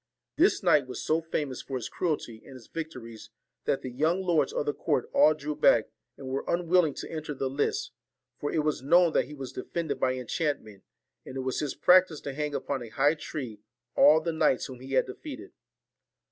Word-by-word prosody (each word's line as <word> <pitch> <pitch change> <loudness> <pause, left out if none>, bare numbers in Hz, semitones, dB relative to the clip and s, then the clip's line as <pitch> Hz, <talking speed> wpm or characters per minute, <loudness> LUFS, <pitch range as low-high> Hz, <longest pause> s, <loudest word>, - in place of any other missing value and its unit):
This - - +3
knight 140 -3 +4
was 130 - -6
so 160 +1 +2
famous 150 -5 -3
for 135 - -4
his 120 - -5
cruelty 145 -10 -3
and 135 - -12
his 125 -3 -12
victories, 125 -9 -8 0.4
that 135 - 0
the 130 - -5
young 160 +9 +1
lords 175 - +2
of - - -2
the 435 - 0
court 450 - -1
all 155 - +6
drew 150 0 -4
back, 115 -7 +4 0.3
and 135 - -9
were 135 +1 -2
unwill 175 0 +3
ing 145 - -5
to - - -7
enter 155 -2 -5
the 135 - -2
lists; 145 +2 -1 0.5
for 145 - -2
it 155 - +1
was 150 -3 0
known 170 +4 +4
that - - +2
he 150 - -10
was 135 -2 -7
defended 140 +1 -3
by 130 0 +1
enchantment, 125 - -3 0.4
and - - -10
it 135 - -2
was 130 0 -2
his 150 - -2
practice 180 -4 +5
to 140 - -5
hang 150 0 -3
upon 140 -2 -2
a 120 - -8
high 145 +6 +3
tree 130 -8 -6 0.4
all 155 +1 +7
the 165 +1 -2
knights 155 -5 +2
whom 130 -2 -9
he 135 +1 -8
had 130 - +4
defeated. 275 - -9
145 Hz, 210 wpm, -28 LUFS, 130-160 Hz, 0.5 s, all